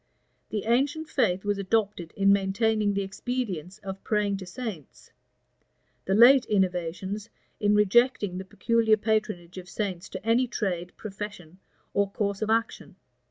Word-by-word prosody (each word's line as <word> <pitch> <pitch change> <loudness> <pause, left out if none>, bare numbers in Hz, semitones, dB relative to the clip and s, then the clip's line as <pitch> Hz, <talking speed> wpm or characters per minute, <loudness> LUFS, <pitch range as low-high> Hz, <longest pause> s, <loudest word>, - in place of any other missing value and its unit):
The 210 -2 -2
ancient 280 +7 +1
faith 195 -7 +1
was 205 -1 0
adopted 200 -4 -1
in 200 0 +4
maintaining 205 +1 +1
the 200 - 0
expedience 195 -4 -4
of 195 0 -7
praying 210 -2 0
to 190 -2 -9
saints; 190 - -8 0.9
the 190 - +1
late 250 +4 +8
innovations 190 +2 -1 0.3
in 205 0 +3
rejecting 210 -2 +3
the - - -5
peculiar 225 +2 +2
patronage 210 -5 -1
of 180 0 -11
saints 190 -3 -4
to - - -8
any 235 +3 +3
trade, 180 -6 -3
profession, 195 -4 -8 0.3
or 200 0 +2
course 200 -1 -2
of 215 - -1
action. 225 -3 -1
205 Hz, 140 wpm, -27 LUFS, 190-225 Hz, 0.9 s, late